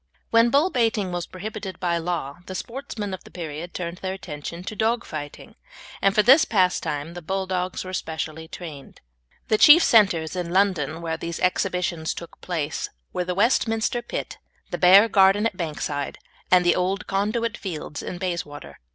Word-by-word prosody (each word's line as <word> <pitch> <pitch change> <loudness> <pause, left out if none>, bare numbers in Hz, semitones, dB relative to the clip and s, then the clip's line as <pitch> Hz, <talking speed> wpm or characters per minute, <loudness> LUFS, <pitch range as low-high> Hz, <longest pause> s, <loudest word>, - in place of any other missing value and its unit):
When 230 +1 +5
bull 290 +8 +3
baiting 225 -6 +1
was 175 -1 -3
prohibited 195 -1 -7
by 170 -2 0
law 165 -3 -3
the 185 - -6
sportsmen 220 -3 -5
of 185 - -7
the - - -14
period 165 0 -7
turned 175 0 -4
their 190 0 -3
attention 170 -1 -7
to 215 - -6
dog 230 +3 0
fighting, 145 -2 -8 0.5
and 195 0 +3
for 210 - +5
this 270 +7 +7
pastime 170 -6 0
the 175 - -7
Bulldogs 185 +1 -2
were 185 - -7
specially 160 -2 -4
trained. 155 -5 -9 0.5
The 215 - +3
chief 320 +3 +9
centres 185 -8 +4
in 175 -2 -3
London 170 -4 +1
where 160 -1 -2
these 170 +1 -5
exhibitions 180 -3 0
took 170 - -10
place 165 -5 -3 0.2
were 180 - -1
the 180 0 -2
Westminster 225 +2 +1
Pit, 240 - -6 0.3
the - - -3
Bear 190 +4 +8
Garden 195 0 +4
at 230 - 0
Bankside, 150 -4 -3 0.3
and 180 -1 +5
the 175 - +4
Old 190 +3 -1
Conduit 215 +4 -1
Fields 160 -6 -6
in 180 - -6
Bayswater. 150 - -5
180 Hz, 170 wpm, -24 LUFS, 165-205 Hz, 0.5 s, chief